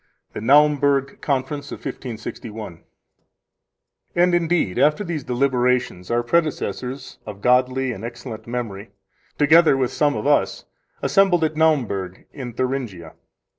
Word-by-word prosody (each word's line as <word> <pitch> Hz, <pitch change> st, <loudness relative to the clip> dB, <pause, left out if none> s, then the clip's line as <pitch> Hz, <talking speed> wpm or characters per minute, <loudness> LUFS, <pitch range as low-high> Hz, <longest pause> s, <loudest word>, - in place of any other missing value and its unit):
The -, -, -5 dB
Naumburg 140 Hz, +1 st, +3 dB
Conference 140 Hz, +1 st, -2 dB
of -, -, -5 dB
1561 110 Hz, -5 st, -7 dB
7 -, -, -33 dB, 1.3 s
And, 175 Hz, +1 st, +3 dB
indeed, 170 Hz, -, +1 dB
after 150 Hz, +7 st, +3 dB
these 165 Hz, -6 st, -4 dB
deliberations 125 Hz, -7 st, 0 dB
our 120 Hz, 0 st, +1 dB
predecessors, 140 Hz, -3 st, -2 dB
of 100 Hz, -1 st, -9 dB
godly 130 Hz, +1 st, +2 dB
and 110 Hz, -3 st, -7 dB
excellent 115 Hz, -1 st, -8 dB
memory, 115 Hz, -4 st, -5 dB, 0.5 s
together 155 Hz, -1 st, +5 dB
with 130 Hz, -2 st, 0 dB
some 145 Hz, -1 st, +2 dB
of -, -, -4 dB
us, 145 Hz, 0 st, +1 dB, 0.4 s
assembled 190 Hz, -4 st, +3 dB
at 155 Hz, 0 st, 0 dB
Naumburg 120 Hz, -, 0 dB
in 125 Hz, -4 st, -7 dB
Thuringia. 120 Hz, -10 st, -3 dB
130 Hz, 125 wpm, -22 LUFS, 120-150 Hz, 1.3 s, together